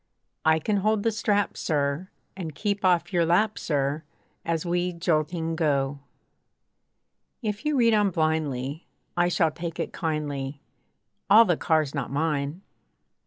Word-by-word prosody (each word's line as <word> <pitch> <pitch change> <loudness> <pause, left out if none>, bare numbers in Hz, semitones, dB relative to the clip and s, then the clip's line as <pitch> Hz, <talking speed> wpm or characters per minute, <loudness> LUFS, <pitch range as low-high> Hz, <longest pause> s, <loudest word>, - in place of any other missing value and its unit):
I 160 0 +4
can 205 +6 0
hold 215 +1 +1
the 230 - +2
strap, 205 -2 0
sir! 150 +3 -1 0.3
And 165 -6 -6
keep 205 +1 -2
off 175 0 +2
your 175 -1 +3
lap, 195 +6 +2
sir! 145 0 -1 0.4
As 165 0 -1
we 175 +1 0
jolting 165 -1 0
go. 140 -3 0 1.4
If 210 +1 -3
you 300 - +1
read 230 -2 +4
on 210 -2 +4
blindly, 155 -3 -1 0.3
I 175 0 +3
shall 165 -2 +2
take 170 +1 -6
it - - -3
kindly, 145 -4 -3 0.7
All 220 +3 +8
the 175 -4 +2
car's 155 -3 +1
not 140 -4 -3
mine. 150 +3 -1
165 Hz, 140 wpm, -26 LUFS, 150-190 Hz, 1.4 s, All